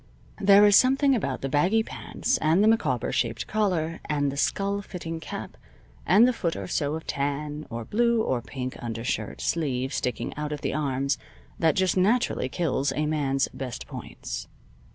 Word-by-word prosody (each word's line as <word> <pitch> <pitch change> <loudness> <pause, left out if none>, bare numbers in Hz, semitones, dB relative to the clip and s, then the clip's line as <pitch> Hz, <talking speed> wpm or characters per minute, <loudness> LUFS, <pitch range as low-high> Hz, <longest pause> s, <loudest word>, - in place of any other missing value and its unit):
There 200 +1 +7
is 205 -1 +6
something 270 +3 +5
about 140 - -1
the 135 - -2
baggy 180 +11 +2
pants, 255 +3 -2
and 165 +6 +3
the - - +5
Micawber 150 - +1
shaped - - -1
collar, 180 -7 0
and 145 -2 +1
the - - -6
skull 200 +7 0
fitting 165 -4 -6
cap, 160 - -7 0.5
and 220 +6 +7
the 255 - +2
foot 170 -7 -2
or 100 - -5
so 145 +10 -1
of 160 - -7
tan, 145 +2 -3
or 115 -1 -5
blue, 235 +1 +2
or 125 - 0
pink 130 +1 -5
undershirt 115 -2 -3
sleeve 135 -5 -1
sticking 125 -2 -2
out 150 0 -4
at 150 - -4
the - - -2
arms, 140 -2 0 0.4
that 160 -1 +3
just 190 -1 +2
naturally 200 - +2
kills 145 -2 0
a 150 - 0
man's 140 -3 +1
best 130 -3 -6
points. - - -7
150 Hz, 175 wpm, -26 LUFS, 135-200 Hz, 0.5 s, There